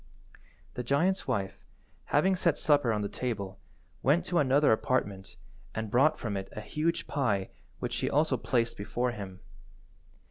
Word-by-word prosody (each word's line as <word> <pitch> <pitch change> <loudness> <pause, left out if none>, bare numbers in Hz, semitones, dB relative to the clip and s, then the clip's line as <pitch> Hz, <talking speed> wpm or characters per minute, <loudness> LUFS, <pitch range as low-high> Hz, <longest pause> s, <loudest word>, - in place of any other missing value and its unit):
The - - -3
giant's 165 +10 +1
wife, 95 -1 -2 0.4
having 185 +6 +3
set 170 -4 +2
supper 145 -6 +3
on 105 -1 0
the - - -1
table, 100 -5 -4 0.4
went 165 +6 +3
to 175 -2 +1
another 140 +1 +4
apartment 105 -4 0 0.4
and 110 -1 -3
brought 135 +6 +4
from 110 -4 -3
it 95 0 -4
a 110 - -5
huge 155 +9 -1
pie 105 -9 0 0.3
which - - -4
she - - 0
also 150 -1 +2
placed 115 -1 0
before 120 +4 -1
him. 100 -5 -8
125 Hz, 150 wpm, -30 LUFS, 105-150 Hz, 0.4 s, another